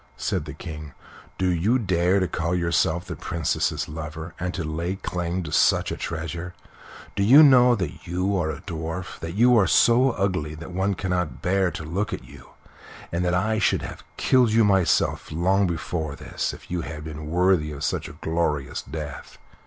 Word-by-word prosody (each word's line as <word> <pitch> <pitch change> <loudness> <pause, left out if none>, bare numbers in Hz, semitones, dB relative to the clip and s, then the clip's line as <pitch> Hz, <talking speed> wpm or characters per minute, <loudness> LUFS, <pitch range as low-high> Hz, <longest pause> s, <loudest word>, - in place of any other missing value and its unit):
said - - -2
the - - -7
King; 75 -3 -8 0.4
"do 95 - 0
you 90 +8 +2
dare 95 -3 +2
to 95 - +1
call 85 +1 -1
yourself 85 0 +1
the - - -6
Princess's 85 -5 -1
lover, 80 +2 -7
and 90 +1 -2
to 90 - -3
lay 85 +4 -2
claim 90 -1 -3
to 75 - -6
such - - +3
a - - -2
treasure? 85 +2 -5 0.6
Do - - 0
you 130 +10 +8
know 125 -4 +7
that 90 -3 -5
you 90 +3 0
are 85 -4 0
a 80 +1 -5
dwarf 85 0 -5
that 85 +2 -6
you 120 +3 +5
are 95 - +3
so 125 +3 +5
ugly 90 -7 -1
that 80 +3 -9
one 95 +2 0
cannot 90 -9 -2
bear 95 0 +2
to 80 -1 -7
look 95 +7 -2
at - - -5
you - - -14 0.6
and 85 +1 -1
that 90 0 +1
I 110 +4 +1
should - - +2
have - - -8
killed 125 -4 +3
you 115 0 +5
myself 95 -4 +2
long 95 +5 +2
before 80 -3 -3
this - - -3
if - - -13
you 90 -1 -1
had 75 -2 -7
been 75 -1 -7
worthy 90 -2 +2
of 70 -1 -7
such - - -2
a - - -10
glorious 80 -4 -2
death?" 75 -3 -7
90 Hz, 190 wpm, -24 LUFS, 80-95 Hz, 0.6 s, you